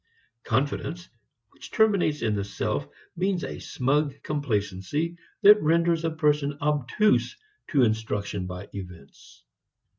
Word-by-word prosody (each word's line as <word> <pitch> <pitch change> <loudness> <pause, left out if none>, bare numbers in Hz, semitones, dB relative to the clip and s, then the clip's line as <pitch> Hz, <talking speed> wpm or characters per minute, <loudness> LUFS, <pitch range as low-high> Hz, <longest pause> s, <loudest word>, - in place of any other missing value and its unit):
Confidence 145 +5 -1 0.4
which - - -12
terminates 200 - +2
in 110 -2 +1
the 100 -1 -1
self 100 - -3 0.3
means 185 0 0
a - - -5
smug 140 +2 0
complacency 140 - -2 0.3
that 210 +1 +8
renders 165 +1 +2
a 165 - +1
person 150 -2 +1
obtuse 150 - +1 0.3
to 140 -6 +3
instruction 105 -4 -1
by 90 +2 -7
events. 90 -7 -11
145 Hz, 115 wpm, -26 LUFS, 105-165 Hz, 0.4 s, that